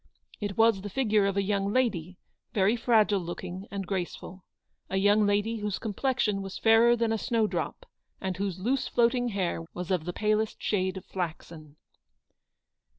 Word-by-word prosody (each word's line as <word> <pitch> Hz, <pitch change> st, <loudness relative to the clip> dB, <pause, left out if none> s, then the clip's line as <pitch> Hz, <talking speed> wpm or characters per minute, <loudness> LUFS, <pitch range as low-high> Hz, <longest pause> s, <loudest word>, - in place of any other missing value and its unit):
It 205 Hz, -2 st, -4 dB
was 225 Hz, -3 st, +4 dB
the 205 Hz, -, -6 dB
figure 215 Hz, -3 st, +2 dB
of 200 Hz, 0 st, -1 dB
a 200 Hz, -, +2 dB
young 200 Hz, 0 st, 0 dB
lady, 190 Hz, -8 st, 0 dB, 0.4 s
very 200 Hz, +2 st, +3 dB
fragile 220 Hz, -4 st, +3 dB
looking 175 Hz, +2 st, -6 dB
and 195 Hz, -1 st, -4 dB
graceful, 185 Hz, 0 st, -5 dB, 0.5 s
A 190 Hz, -, -1 dB
young 205 Hz, +2 st, +4 dB
lady 205 Hz, +3 st, +1 dB
whose 210 Hz, -2 st, -2 dB
com 220 Hz, -4 st, -4 dB
plexion 225 Hz, -4 st, 0 dB
was 195 Hz, -1 st, -6 dB
fairer 230 Hz, +1 st, +5 dB
than 230 Hz, -1 st, 0 dB
a 220 Hz, -, -1 dB
snow 230 Hz, -1 st, +1 dB
drop, -, -, -3 dB, 0.3 s
and 190 Hz, -1 st, -3 dB
whose 195 Hz, -1 st, -3 dB
loose 255 Hz, +7 st, 0 dB
floating 245 Hz, +1 st, +2 dB
hair 190 Hz, -6 st, -2 dB
was 180 Hz, +1 st, -4 dB
of 175 Hz, -4 st, 0 dB
the 175 Hz, -, -2 dB
palest 215 Hz, +1 st, 0 dB
shade 190 Hz, -2 st, -1 dB
of 185 Hz, -, -9 dB
flaxen. 160 Hz, -4 st, -6 dB
205 Hz, 170 wpm, -28 LUFS, 190-225 Hz, 0.5 s, fairer